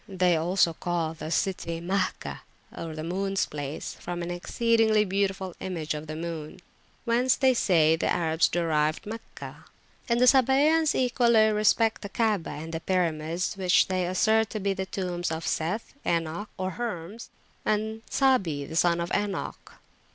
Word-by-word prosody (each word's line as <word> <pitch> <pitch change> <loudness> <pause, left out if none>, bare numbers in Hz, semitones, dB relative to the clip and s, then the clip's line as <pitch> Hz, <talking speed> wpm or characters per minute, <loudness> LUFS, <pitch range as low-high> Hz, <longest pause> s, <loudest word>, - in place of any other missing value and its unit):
They 180 -2 +2
also 170 +1 +2
call 165 -1 -2
the 160 -1 -7
city 170 -1 -1
Mahgah 185 +2 -2 0.3
moons 175 +5 -2
placefrom 150 +4 -5
an 170 - -4
exceedingly 220 +3 +2
beautiful 190 -1 -1
image 165 -5 -3
of 150 +1 -6
the 155 - -5
moon; 165 0 -6 0.5
whence 245 +1 +3
they 260 -1 +3
say 160 -9 +3
the 165 - -1
Arabs 160 -1 +2
derived 155 -2 0
Meccah. 225 +2 -9 0.4
And 235 0 +2
the 250 - +5
Sabaeans 280 +5 +4
equally 235 -3 +3
respect 215 +1 +2
the 200 - -6
Kaabah 210 -6 0
and 165 +1 -8
the 165 - -2
pyramids, 170 -1 -1
which 185 -1 +3
they 185 -1 0
assert 220 +4 +2
to 215 - -4
be 200 0 0
the 190 0 -4
tombs 180 -3 -3
of 160 0 -4
Seth, 180 +8 -2
Enoch 170 +5 -2
(or 185 0 -2
Hermes), 215 -1 -6 0.3
and 220 +1 -1
Sabi 195 - +2
the 160 - -8
son 170 0 +3
of 170 +1 -3
Enoch. 205 -1 -3
185 Hz, 150 wpm, -27 LUFS, 165-220 Hz, 0.5 s, the